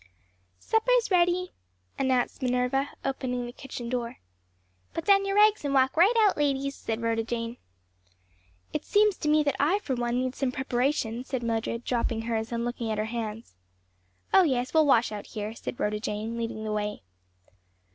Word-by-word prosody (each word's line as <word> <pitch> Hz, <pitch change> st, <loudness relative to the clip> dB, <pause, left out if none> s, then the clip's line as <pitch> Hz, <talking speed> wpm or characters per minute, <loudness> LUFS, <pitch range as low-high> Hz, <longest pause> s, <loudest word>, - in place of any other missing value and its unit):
"Supper's 465 Hz, 0 st, +2 dB
ready," 360 Hz, 0 st, +2 dB, 0.5 s
announced 260 Hz, 0 st, 0 dB
Minerva, 250 Hz, +2 st, +1 dB, 0.2 s
opening 250 Hz, -2 st, -2 dB
the 240 Hz, -, -6 dB
kitchen 245 Hz, -3 st, -7 dB
door. 235 Hz, -1 st, -3 dB, 0.8 s
"Put 330 Hz, -, -3 dB
down 395 Hz, 0 st, +4 dB
your 390 Hz, -, 0 dB
rags 420 Hz, -2 st, +5 dB
and 280 Hz, -1 st, -1 dB
walk 265 Hz, 0 st, +3 dB
right 355 Hz, +7 st, +6 dB
out, 415 Hz, -3 st, +4 dB
ladies," 275 Hz, -1 st, 0 dB
said 225 Hz, -3 st, -4 dB
Rhoda 225 Hz, 0 st, +1 dB
Jane. 230 Hz, +1 st, -4 dB, 1.2 s
"It -, -, -2 dB
seems 420 Hz, -1 st, +3 dB
to 300 Hz, -, -1 dB
me 305 Hz, 0 st, +4 dB
that 285 Hz, -2 st, 0 dB
I, 315 Hz, +8 st, +3 dB
for 300 Hz, -10 st, -3 dB
one, 240 Hz, -1 st, -1 dB
need 255 Hz, 0 st, -1 dB
some 270 Hz, -2 st, -1 dB
preparation," 250 Hz, -2 st, -1 dB
said 260 Hz, -2 st, -4 dB
Mildred, 230 Hz, 0 st, -2 dB
dropping 235 Hz, -2 st, -1 dB
hers 225 Hz, -1 st, -2 dB
and 235 Hz, 0 st, -1 dB
looking 240 Hz, -1 st, -3 dB
at 215 Hz, -, -1 dB
her 215 Hz, -, 0 dB
hands. 225 Hz, -, -5 dB, 0.8 s
"Oh 385 Hz, -, +8 dB
yes, 255 Hz, -7 st, 0 dB
we'll 315 Hz, -2 st, +5 dB
wash 240 Hz, -4 st, +4 dB
out 210 Hz, -1 st, -6 dB
here," 210 Hz, +1 st, -5 dB
said 235 Hz, -, -7 dB
Rhoda 210 Hz, 0 st, 0 dB
Jane, 215 Hz, +2 st, -3 dB
leading 230 Hz, -2 st, -4 dB
the 215 Hz, -, -3 dB
way. 210 Hz, -, -3 dB
250 Hz, 175 wpm, -27 LUFS, 230-295 Hz, 1.2 s, Oh